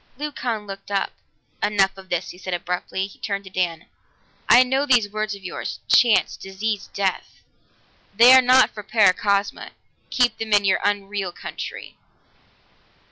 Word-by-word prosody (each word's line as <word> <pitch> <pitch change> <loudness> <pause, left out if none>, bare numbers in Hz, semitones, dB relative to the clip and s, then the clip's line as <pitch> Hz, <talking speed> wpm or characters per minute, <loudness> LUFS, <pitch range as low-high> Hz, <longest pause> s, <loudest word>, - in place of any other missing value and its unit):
Leucon 250 -7 -4
looked 195 0 -10
up. 200 -1 -1 0.5
"Enough 200 -2 +1
of 190 -1 -14
this," 175 +1 -2
he - - -14
said 185 -1 -4
abruptly. 180 +2 -3
He 195 - -14
turned 200 -1 -4
to 190 - -13
Dan, 175 -3 -2 0.6
"I 245 - +8
know 265 +3 -1
these 245 -6 +3
words 215 0 -3
of 200 - -15
yours 185 - -6
chance, 235 -4 +4
disease, 200 +2 -4
death. 195 -2 -3 0.7
They 240 +4 +8
are 260 - +8
not 255 +1 +4
for 210 - -8
Paracosma. 200 -1 +1 0.4
Keep 245 -3 +1
them 220 -1 -3
in 205 -1 +4
your 190 -1 +2
unreal 200 -2 -2
country." - - -8
205 Hz, 150 wpm, -22 LUFS, 195-225 Hz, 0.7 s, I